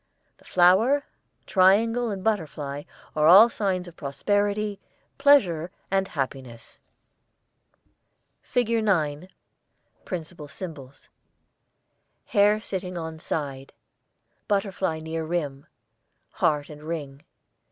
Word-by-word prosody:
The - - -23
flower, 210 +11 +4 0.4
triangle, 225 +5 +3
and 195 -3 -5
butterfly 150 -9 -2 0.3
are 155 0 +3
all 200 +7 +9
signs 190 -5 -2
of 175 - -12
prosperity, 205 +7 -1 0.4
pleasure 180 - +4 0.2
and 195 0 +1
happiness. 130 -6 -6 1.6
[ILLUSTRATION 230 -2 0
9] 160 -5 0
FIG.9 - - -33 0.7
Principal 165 -4 -7
Symbols: 145 -5 -10 1.2
Hare 210 0 +3
sitting 185 -4 -5
on 160 -1 -6
side. 140 -4 -4 0.7
Butterfly 195 -4 -1
near 160 0 -4
rim. 150 -4 -3 0.6
Heart 150 -2 0
and 150 0 -11
ring. 150 -3 -6
175 Hz, 95 wpm, -25 LUFS, 150-205 Hz, 1.6 s, all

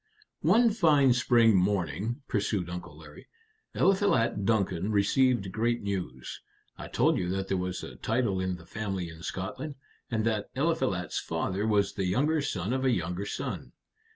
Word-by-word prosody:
"One 235 0 +5
fine 150 - +4
spring 120 -3 +4
morning," 100 - 0
pursued 100 -4 -1
Uncle 85 -4 -7
Larry, 75 -2 -13 0.5
"Eliphalet 190 - +2
Duncan 100 -3 +1
received 105 0 +2
great 115 +3 0
news. 90 -11 -4 0.3
I - - -8
told - - +2
you 90 - -2
that 95 +1 -2
there 95 - +1
was 90 0 -3
a - - -9
title 110 -4 0
in 95 0 -1
the 85 -1 -13
family 95 -3 -4
in 80 0 -11
Scotland, 105 - -5 0.3
and 110 -2 -1
that 110 -2 -1
Eliphalet's 130 - 0
father 100 +3 -2
was 105 -2 +2
the 95 - -2
younger 145 - +1
son 100 -4 -2
of 130 0 -1
a 130 - +3
younger 90 -2 -1
son. - - -5
100 Hz, 155 wpm, -29 LUFS, 90-120 Hz, 0.5 s, One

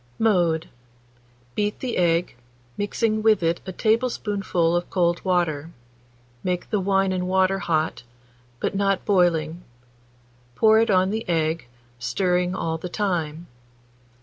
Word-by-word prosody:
Mode. 175 -7 +2 0.9
Beat 210 0 -1
the 250 -3 -3
egg, 170 -4 +1 0.4
mixing 215 +1 0
with 215 -4 +3
it 165 +1 +1
a - - -3
tablespoonful 205 -6 0
of 175 0 -1
cold 175 -2 +1
water; 170 -5 0 0.7
make 180 +3 -2
the 210 - +2
wine 195 0 +2
and 180 -1 -1
water 190 +1 +2
hot, 160 -3 -1 0.6
but - - -1
not 195 -1 0
boiling; 175 -3 +1 0.9
pour 220 - +5
it 230 0 +2
on 190 -1 +3
the 220 +1 -2
egg, 160 -3 0 0.3
stirring 180 +8 0
all 160 -3 -2
the 180 - -6
time. 170 -5 -2
180 Hz, 125 wpm, -24 LUFS, 170-200 Hz, 0.9 s, pour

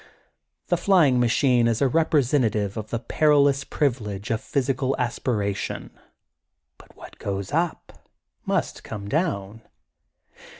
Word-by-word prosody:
The - - +2
fly 190 -5 +4
ing 130 -3 +3
machine 120 0 +3
is 115 -1 +1
a 140 - +3
representative 125 -9 +1
of 110 -1 -6
the 115 - -1
peril 145 +4 +3
ous 140 0 0
privilege 110 -8 -2
of 110 - -1
physical 135 -1 -1
aspiration. 115 -4 -2 0.9
But - - -19
what - - -13
goes 100 -1 -4
up 170 +2 -3 0.3
must - - -2
come 100 -3 -7
down. 115 - -2
125 Hz, 125 wpm, -24 LUFS, 110-145 Hz, 0.9 s, fly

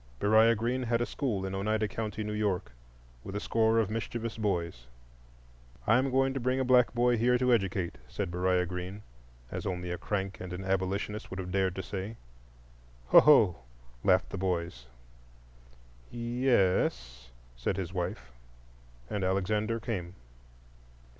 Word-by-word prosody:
Beriah 110 +2 +5
Green 120 +4 -1
had 115 -1 0
a 120 - +1
school 105 -3 -2
in 95 - -4
Oneida 110 +2 0
County, 110 +1 -4
New 105 0 -4
York, 105 - -1 0.5
with 95 - -7
a - - -1
score 110 +1 +2
of 110 -2 +1
mischievous 115 +1 -3
boys. 85 - -2 1.0
"I'm 125 +5 +3
going 135 +1 +2
to 135 - -2
bring 130 +1 0
a - - +2
black 125 -1 +5
boy 120 0 +3
here 125 +2 +4
to 125 0 +3
educate," 95 - -1
said 95 +5 -4
Beriah 90 0 +1
Green, 90 +3 -6 0.5
as - - -4
only 90 -1 -3
a 90 - -4
crank 100 -2 -3
and 90 -1 -6
an 95 +1 -5
abolitionist 95 +3 -2
would 95 - -6
have 90 -1 -5
dared 95 -1 +1
to 95 - -4
say. 100 +4 -5 1.0
"Oho!" 115 - +7 0.5
laughed 95 -1 +3
the 100 - -4
boys. 85 -9 -2 1.2
"Ye 120 +2 -2
es," 60 - +1 0.3
said 65 +10 -2
his 95 -2 -4
wife; 75 -9 -4 0.8
and 100 +5 -3
Alexander 105 +4 0
came. 95 -6 -4
100 Hz, 150 wpm, -30 LUFS, 90-115 Hz, 1.2 s, Oho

